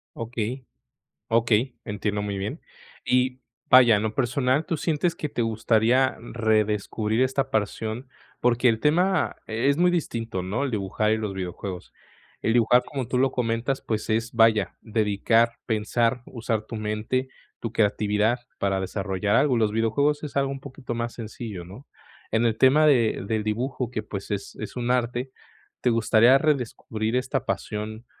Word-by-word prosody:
Okey, 115 Hz, +2 st, -4 dB, 0.6 s
okey, 115 Hz, +2 st, +2 dB
entiendo 105 Hz, -1 st, -2 dB
muy 100 Hz, -1 st, -3 dB
bien. 100 Hz, +2 st, -4 dB, 0.5 s
Y, 125 Hz, 0 st, +1 dB, 0.3 s
vaya, 125 Hz, -3 st, +8 dB
en 105 Hz, -, 0 dB
lo 110 Hz, 0 st, -1 dB
personal, 130 Hz, +3 st, +1 dB
¿tú 165 Hz, -, -1 dB
sientes 165 Hz, +2 st, 0 dB
que 150 Hz, -, -4 dB
te 120 Hz, -, -2 dB
gustaría 115 Hz, +3 st, +2 dB, 0.2 s
redescubrir 110 Hz, 0 st, +1 dB
esta 135 Hz, +1 st, +1 dB
pasión? 110 Hz, +2 st, -2 dB, 0.3 s
Porque 125 Hz, +1 st, +3 dB
el 110 Hz, -2 st, +2 dB
tema 180 Hz, +4 st, +2 dB
es 125 Hz, +6 st, +1 dB
muy 180 Hz, +1 st, +4 dB
distinto, 115 Hz, -, -2 dB
¿no?, 105 Hz, +10 st, -1 dB
el 135 Hz, -, -3 dB
dibujar 105 Hz, 0 st, 0 dB
y -, -, +1 dB
los 105 Hz, -3 st, -3 dB
videojuegos. 95 Hz, 0 st, -6 dB, 0.5 s
El 115 Hz, -, +1 dB
dibujar, 120 Hz, +1 st, +4 dB
como 135 Hz, -5 st, -5 dB
tú 125 Hz, -, -1 dB
lo 135 Hz, +1 st, +3 dB
comentas, 120 Hz, +2 st, -1 dB
pues, 110 Hz, -1 st, -3 dB
es, 115 Hz, +1 st, 0 dB
vaya, 115 Hz, -3 st, +3 dB
dedicar, 110 Hz, +1 st, +2 dB
pensar, 115 Hz, +2 st, 0 dB
usar 115 Hz, -3 st, -3 dB
tu 115 Hz, -, -7 dB
mente, 110 Hz, +5 st, -2 dB, 0.3 s
tu 115 Hz, -, -3 dB
creatividad 105 Hz, +2 st, +1 dB, 0.2 s
para 95 Hz, -1 st, 0 dB
desarrollar 95 Hz, +1 st, -1 dB
algo. 135 Hz, -2 st, +3 dB
Los 110 Hz, -2 st, +2 dB
videojuegos 125 Hz, +7 st, +1 dB
es 150 Hz, -, -6 dB
algo 140 Hz, -1 st, +1 dB
un 135 Hz, -, -5 dB
poquito 130 Hz, -2 st, -7 dB
más 115 Hz, 0 st, -3 dB
sencillo, 110 Hz, -4 st, -7 dB
¿no? 100 Hz, +11 st, -12 dB, 0.4 s
En 110 Hz, +1 st, +2 dB
el 110 Hz, -2 st, +1 dB
tema 140 Hz, +5 st, +5 dB
de 120 Hz, -9 st, +3 dB
del 110 Hz, +1 st, -1 dB
dibujo 120 Hz, +3 st, -2 dB
que, 110 Hz, -3 st, -4 dB
pues, 100 Hz, -1 st, -7 dB
es 100 Hz, -1 st, -4 dB
es 110 Hz, -, -7 dB
un 125 Hz, 0 st, -1 dB
arte, 125 Hz, +1 st, -1 dB, 0.5 s
¿te 125 Hz, -, +1 dB
gustaría 115 Hz, +3 st, +5 dB
redescubrir 120 Hz, -6 st, -1 dB
esta 130 Hz, +1 st, -1 dB
pasión? 105 Hz, +3 st, -4 dB
115 Hz, 160 wpm, -25 LUFS, 110-130 Hz, 0.6 s, vaya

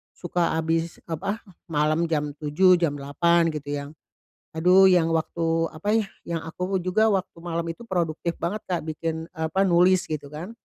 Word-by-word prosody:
suka 175 Hz, -2 st, -1 dB
habis, 165 Hz, +1 st, -1 dB
apa, 195 Hz, +7 st, -3 dB, 0.3 s
malam 155 Hz, +2 st, +1 dB
jam 150 Hz, -2 st, 0 dB
7:00, 150 Hz, -1 st, -5 dB, 0.3 s
jam 155 Hz, -4 st, 0 dB
8:00, 170 Hz, +5 st, +2 dB
gitu 145 Hz, -1 st, -6 dB
yang 140 Hz, -, -10 dB, 0.7 s
aduh, 185 Hz, +3 st, +6 dB
yang 175 Hz, -3 st, +4 dB
waktu, 165 Hz, 0 st, 0 dB
apa 165 Hz, +6 st, -6 dB
ya, 215 Hz, -3 st, +1 dB, 0.2 s
yang 170 Hz, -1 st, -3 dB
aku 180 Hz, +3 st, -2 dB
juga 200 Hz, +5 st, +2 dB
waktu 185 Hz, -2 st, -2 dB
malam 170 Hz, -1 st, -2 dB
itu 235 Hz, +8 st, -8 dB
produktif 170 Hz, -2 st, -1 dB
banget, 205 Hz, +5 st, -2 dB
Kak 175 Hz, -2 st, -1 dB
bikin 160 Hz, +1 st, -3 dB
apa, 160 Hz, +4 st, -1 dB
nulis 180 Hz, +1 st, +4 dB
gitu 150 Hz, -2 st, -4 dB
kan. 175 Hz, +9 st, -7 dB
165 Hz, 165 wpm, -25 LUFS, 160-180 Hz, 0.7 s, aduh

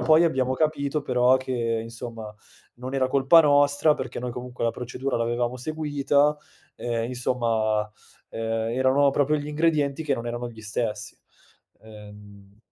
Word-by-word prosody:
poi 160 Hz, +1 st, +5 dB
abbiamo 130 Hz, -5 st, +1 dB
capito 150 Hz, 0 st, -1 dB
però 125 Hz, -1 st, +3 dB
che 130 Hz, 0 st, -5 dB, 0.3 s
insomma, 115 Hz, -1 st, -8 dB, 0.4 s
non 130 Hz, +2 st, -6 dB
era 130 Hz, -1 st, +1 dB
colpa 140 Hz, +5 st, +6 dB
nostra 145 Hz, +1 st, +4 dB
perché 130 Hz, -3 st, -6 dB
noi 125 Hz, 0 st, -4 dB
comunque 125 Hz, 0 st, -6 dB
la 115 Hz, -, +2 dB
procedura 125 Hz, +3 st, -4 dB
l'avevamo 120 Hz, +1 st, -1 dB
seguita, 145 Hz, 0 st, +1 dB, 0.4 s
ehm, 115 Hz, -1 st, -2 dB
insomma, 115 Hz, -3 st, 0 dB, 0.4 s
ehm, 115 Hz, 0 st, -2 dB
erano 135 Hz, +2 st, +3 dB
proprio 145 Hz, +2 st, +1 dB
gli 145 Hz, -1 st, -5 dB
ingredienti 150 Hz, -1 st, 0 dB
che 145 Hz, -3 st, 0 dB
non 120 Hz, -1 st, -6 dB
erano 120 Hz, +1 st, -4 dB
gli 110 Hz, -2 st, -12 dB
stessi. 110 Hz, 0 st, -3 dB, 0.7 s
Ehm 105 Hz, -2 st, -14 dB
125 Hz, 140 wpm, -25 LUFS, 115-145 Hz, 0.7 s, colpa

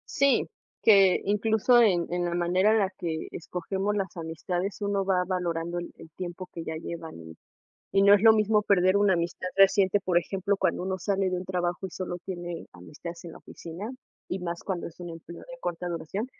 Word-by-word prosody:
Sí, 280 Hz, -4 st, +3 dB, 0.3 s
que 195 Hz, -4 st, +6 dB
incluso 220 Hz, +4 st, +3 dB
en 175 Hz, -6 st, +3 dB
en 175 Hz, 0 st, 0 dB
la 175 Hz, -, -1 dB
manera 180 Hz, +4 st, +3 dB
en 220 Hz, -, +4 dB
la 190 Hz, -, +1 dB
que 160 Hz, -2 st, -3 dB
escogemos 190 Hz, +4 st, -3 dB
las 195 Hz, -2 st, -3 dB
amistades 175 Hz, +4 st, -3 dB
uno 200 Hz, -1 st, 0 dB
va 185 Hz, -2 st, +2 dB
valorando 175 Hz, -2 st, -2 dB
el 175 Hz, -, -6 dB
el 160 Hz, -, -13 dB
tiempo 180 Hz, 0 st, -6 dB
que 165 Hz, -, -6 dB
ya 160 Hz, -, -4 dB
llevan, 160 Hz, -, -8 dB, 0.6 s
y 195 Hz, -, +3 dB
no 200 Hz, 0 st, +8 dB
es 205 Hz, -, +5 dB
lo 225 Hz, 0 st, +8 dB
mismo 215 Hz, 0 st, +3 dB
perder 190 Hz, -2 st, +3 dB
una 200 Hz, -1 st, +4 dB
amistad 175 Hz, +1 st, -2 dB
reciente, 195 Hz, 0 st, +5 dB
por 180 Hz, -2 st, +1 dB
ejemplo, 195 Hz, +3 st, 0 dB
cuando 180 Hz, -, 0 dB
uno 190 Hz, 0 st, -2 dB
sale 195 Hz, +1 st, 0 dB
de 185 Hz, -, -1 dB
un 180 Hz, -, -4 dB
trabajo 180 Hz, 0 st, -2 dB
y -, -, -12 dB
solo 180 Hz, -1 st, -4 dB
tiene 175 Hz, -2 st, -5 dB
amistades 155 Hz, -, -10 dB
en 165 Hz, -, -8 dB
la -, -, -11 dB
oficina, 180 Hz, +8 st, -8 dB, 0.4 s
y 190 Hz, -, -2 dB
más 170 Hz, -1 st, -5 dB
cuando 185 Hz, -3 st, -3 dB
es 170 Hz, -, -14 dB
un 175 Hz, -, -6 dB
empleo 165 Hz, +1 st, -10 dB
de 255 Hz, 0 st, -11 dB
corta 175 Hz, -3 st, -3 dB
duración, 175 Hz, +5 st, -3 dB
180 Hz, 200 wpm, -27 LUFS, 170-200 Hz, 0.6 s, no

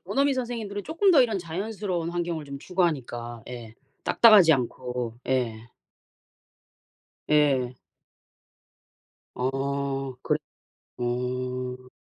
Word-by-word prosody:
원어민 275 Hz, 0 st, +2 dB
선생님들은 230 Hz, -5 st, -4 dB
쪼끔 355 Hz, +5 st, +3 dB
더 285 Hz, -6 st, +7 dB
이런 220 Hz, -5 st, 0 dB
자연스러운 185 Hz, 0 st, -3 dB
환경을 170 Hz, -3 st, -2 dB
좀 140 Hz, -1 st, -7 dB
추구하니까 130 Hz, -9 st, -2 dB
예. 120 Hz, -3 st, -8 dB, 0.3 s
딱딱하지 205 Hz, -8 st, +7 dB
않고. 125 Hz, -2 st, -2 dB
예. 115 Hz, -3 st, -1 dB, 1.6 s
예. 135 Hz, -5 st, +3 dB, 1.6 s
어. 135 Hz, +1 st, -2 dB
그래 -, -, +1 dB, 0.6 s
어. 125 Hz, +1 st, -3 dB
140 Hz, 200 characters per minute, -26 LUFS, 125-190 Hz, 1.6 s, 더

